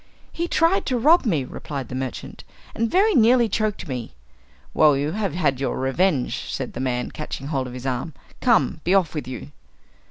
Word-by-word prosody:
"He 340 Hz, +1 st, -3 dB
tried 335 Hz, +3 st, +2 dB
to 255 Hz, -, +1 dB
rob 300 Hz, +3 st, +4 dB
me," 160 Hz, -10 st, +1 dB
replied 135 Hz, 0 st, -6 dB
the -, -, -9 dB
merchant, 130 Hz, 0 st, -5 dB, 0.3 s
"and 230 Hz, 0 st, -1 dB
very 410 Hz, -, +3 dB
nearly 240 Hz, -1 st, +5 dB
choked 215 Hz, -2 st, -2 dB
me." 125 Hz, -4 st, -5 dB, 0.6 s
"Well, 150 Hz, -3 st, +5 dB
you 145 Hz, +2 st, -1 dB
have 200 Hz, -4 st, -2 dB
had 150 Hz, -7 st, +1 dB
your 135 Hz, -, -1 dB
revenge," 135 Hz, +2 st, 0 dB
said 130 Hz, -2 st, -4 dB
the -, -, -6 dB
man, 125 Hz, -1 st, -2 dB
catching 150 Hz, -3 st, -6 dB
hold 135 Hz, -4 st, -1 dB
of 125 Hz, -, -8 dB
his 125 Hz, 0 st, -8 dB
arm. 130 Hz, +4 st, -3 dB, 0.2 s
"Come, 230 Hz, -9 st, +2 dB
be 180 Hz, +3 st, +3 dB
off 185 Hz, -5 st, +2 dB
with 150 Hz, -4 st, -4 dB
you!" 120 Hz, -, -7 dB
155 Hz, 190 wpm, -23 LUFS, -, 0.6 s, nearly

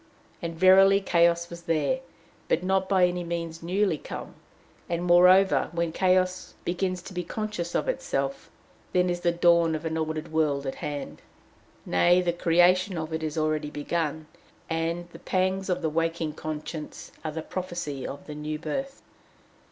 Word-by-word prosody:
And, 170 Hz, -1 st, -4 dB
verily, 190 Hz, +3 st, +6 dB
chaos 170 Hz, -2 st, +2 dB
was 170 Hz, 0 st, -8 dB
there, 165 Hz, -, +1 dB, 0.5 s
but 175 Hz, -, +1 dB
not 190 Hz, 0 st, +1 dB
by 190 Hz, -2 st, +5 dB
any 180 Hz, 0 st, -1 dB
means 170 Hz, -1 st, -4 dB
newly 180 Hz, -1 st, 0 dB
come. -, -, -7 dB, 0.6 s
And, 170 Hz, 0 st, -1 dB
moreover, 180 Hz, +2 st, +5 dB
when 170 Hz, -1 st, -1 dB
chaos 185 Hz, +1 st, +1 dB
begins 180 Hz, 0 st, -1 dB
to 190 Hz, -, -9 dB
be 180 Hz, -1 st, -3 dB
conscious 210 Hz, -3 st, -4 dB
of -, -, 0 dB
itself, 140 Hz, -, -2 dB, 0.4 s
then 180 Hz, 0 st, +3 dB
is 175 Hz, -, -2 dB
the 175 Hz, 0 st, +2 dB
dawn 170 Hz, -1 st, +4 dB
of 155 Hz, +1 st, -6 dB
an 160 Hz, 0 st, -2 dB
ordered 155 Hz, 0 st, -3 dB
world 145 Hz, -3 st, +1 dB
at 135 Hz, -, -2 dB
hand. 145 Hz, -2 st, -5 dB, 0.6 s
Nay, 175 Hz, -, +4 dB
the 175 Hz, -1 st, 0 dB
creation 175 Hz, +2 st, +3 dB
of 160 Hz, 0 st, -4 dB
it 160 Hz, -, -2 dB
is 155 Hz, 0 st, -3 dB
already 155 Hz, -1 st, 0 dB
begun, 155 Hz, +1 st, -2 dB, 0.5 s
and 165 Hz, +2 st, -1 dB
the -, -, -12 dB
pangs 190 Hz, +1 st, 0 dB
of 180 Hz, -, -1 dB
the -, -, +2 dB
waking 165 Hz, 0 st, -1 dB
conscience 155 Hz, 0 st, -6 dB
are 155 Hz, -, -3 dB
the 160 Hz, 0 st, -4 dB
prophecy 175 Hz, -7 st, -4 dB
of 140 Hz, -, -8 dB
the 150 Hz, -, -7 dB
new 150 Hz, +1 st, -4 dB
birth. 270 Hz, -, -5 dB
170 Hz, 165 wpm, -27 LUFS, 155-185 Hz, 0.6 s, verily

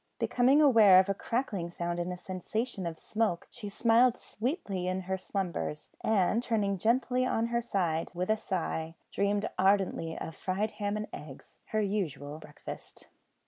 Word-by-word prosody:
Becoming 265 Hz, +5 st, +4 dB
aware 220 Hz, -9 st, +8 dB
of 190 Hz, +1 st, +2 dB
a -, -, +3 dB
crackling 200 Hz, -5 st, -2 dB
sound 170 Hz, 0 st, -3 dB
and 175 Hz, +1 st, -2 dB
a 180 Hz, -, -5 dB
sensation 190 Hz, +2 st, -3 dB
of 165 Hz, -1 st, -5 dB
smoke, 215 Hz, -4 st, -1 dB
she 215 Hz, -4 st, -7 dB
smiled 235 Hz, +4 st, +4 dB
sweetly 215 Hz, -, -3 dB
in 185 Hz, +1 st, -1 dB
her 190 Hz, +1 st, -2 dB
slumbers, 185 Hz, -5 st, -3 dB
and, 220 Hz, +1 st, +3 dB
turning 205 Hz, -5 st, 0 dB
gently 250 Hz, +4 st, +2 dB
on 230 Hz, -3 st, +1 dB
her 235 Hz, -, +3 dB
other 235 Hz, -, -8 dB
side, 165 Hz, -6 st, 0 dB
with 180 Hz, +4 st, 0 dB
a -, -, +4 dB
sigh, 165 Hz, -5 st, -3 dB, 0.2 s
dreamed 200 Hz, +1 st, +1 dB
ardently 190 Hz, -4 st, +2 dB
of 160 Hz, -, -6 dB
fried 200 Hz, +4 st, -1 dB
ham 205 Hz, 0 st, -2 dB
and 215 Hz, -, -4 dB
eggs 145 Hz, -3 st, -10 dB
her 215 Hz, -, 0 dB
usual 155 Hz, -8 st, -2 dB
breakfast. -, -, -10 dB
200 Hz, 165 wpm, -30 LUFS, 180-225 Hz, 0.2 s, aware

